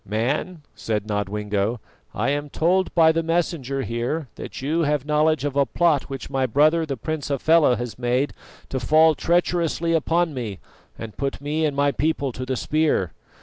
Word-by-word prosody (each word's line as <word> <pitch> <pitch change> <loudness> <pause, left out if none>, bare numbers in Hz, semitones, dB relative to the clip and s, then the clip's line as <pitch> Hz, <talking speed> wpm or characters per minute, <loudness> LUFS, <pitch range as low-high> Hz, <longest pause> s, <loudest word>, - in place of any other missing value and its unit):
"Man," 140 - -2
said 110 -2 -3
Nodwengo, 105 +1 -2 0.3
"I 140 - -1
am 145 0 -2
told 180 +5 +1
by 160 -2 +6
the 165 +1 0
Messenger 160 -5 -1
here 120 +5 -3
that 100 - -8
you 155 +5 0
have 145 -3 0
knowledge 150 -1 +2
of 140 -2 -2
a 140 -1 +3
plot 160 0 +1
which 135 -1 -6
my 135 -1 0
brother 155 +6 +3
the 135 -2 -3
Prince 155 +5 -4
Hafela 145 -1 +3
has 120 0 -6
made 125 +3 0 0.4
to 130 - -2
fall 155 +6 +5
treacherously 170 0 0
upon 165 +1 +1
me 115 -7 -5 0.4
and 110 -2 -8
put 140 -1 -2
me 150 +3 0
and 145 - -3
my 140 0 +3
people 145 -2 -1
to 130 +1 -6
the 130 - -1
spear. 150 - 0
145 Hz, 175 wpm, -23 LUFS, 125-160 Hz, 0.4 s, by